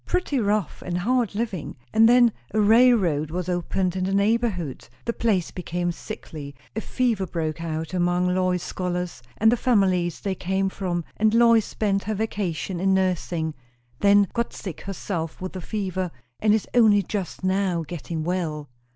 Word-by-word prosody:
Pretty 360 -7 0
rough; 210 -5 0
and 175 -1 -2
hard 235 +3 +1
living. 205 -7 -3 0.2
And 225 +1 +6
then 240 -2 +6 0.2
a - - +3
railroad 210 -9 +4
was 180 +2 -3
opened 180 +1 -1
in 185 -1 -1
the 195 +1 0
neighbourhood 200 - 0 0.2
the 235 - 0
place 205 -8 0
became 175 0 -2
sickly 155 -7 -8 0.2
a 220 - -1
fever 230 -8 0
broke 160 -1 -3
out 160 +1 -4
among 175 0 +1
Lois's 185 -1 +1
scholars 180 -5 -3 0.2
and 220 +1 +5
the 245 - +2
families 185 -8 +2
they 195 - -2
came 190 +1 -1
from; 175 -4 -3
and 215 +1 +3
Lois 230 -2 +5
spent 195 -3 -1
her 215 +1 -1
vacation 195 -4 -2
in 190 +1 +3
nursing. 175 -4 0 0.5
Then 200 0 +5
got 235 0 -1
sick 175 -6 -7
herself 175 -4 -4
with 185 0 -5
the 185 - -5
fever, 185 -2 -2 0.3
and 215 - +3
is 215 -1 +2
only 215 -4 +5
just 190 -1 -4
now 185 -2 +1
getting 165 -1 -4
well." 160 -4 -2
190 Hz, 165 wpm, -24 LUFS, 175-215 Hz, 0.5 s, And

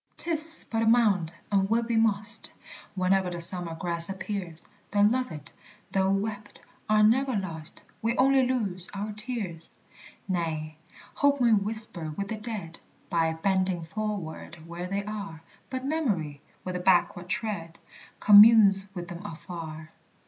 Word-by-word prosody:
'Tis 325 -1 +3
but 225 -1 0
a - - +1
mound, 210 -8 +3 0.2
and 195 -1 +1
will 230 +1 +1
be 230 0 -2
mossed 215 -1 +2 0.4
Whene'er 185 0 +1
the 175 -1 -6
summer 170 -1 +6
grass 170 0 +4
appears; 190 -3 -5 0.2
The 205 0 +2
loved, 215 - -1 0.4
though 190 0 +1
wept, 205 +1 -3 0.3
are 215 0 +4
never 255 +4 +2
lost; 165 -6 -6 0.2
We 230 +2 -1
only 270 +1 +4
lose 215 -9 0
our 205 +2 -4
tears! 210 -7 -4 0.6
Nay, 160 -4 -3 0.4
Hope 285 0 +1
may 235 -2 +3
whisper 200 -6 +1
with 200 -1 -4
the 220 - -3
dead 210 -7 -7 0.3
By 165 -1 +1
bending 185 0 -1
forward 170 -4 -6
where 170 +1 -6
they 200 +2 -3
are; 200 -7 -7 0.3
But 260 0 -5
Memory, 200 - -2 0.2
with 185 0 -5
a - - -2
backward 180 -1 +1
tread, 170 -7 -4 0.4
Communes 205 -2 +7
with 175 -1 -6
them 175 +2 -9
afar. 160 -4 -9
195 Hz, 140 wpm, -27 LUFS, 170-220 Hz, 0.6 s, Communes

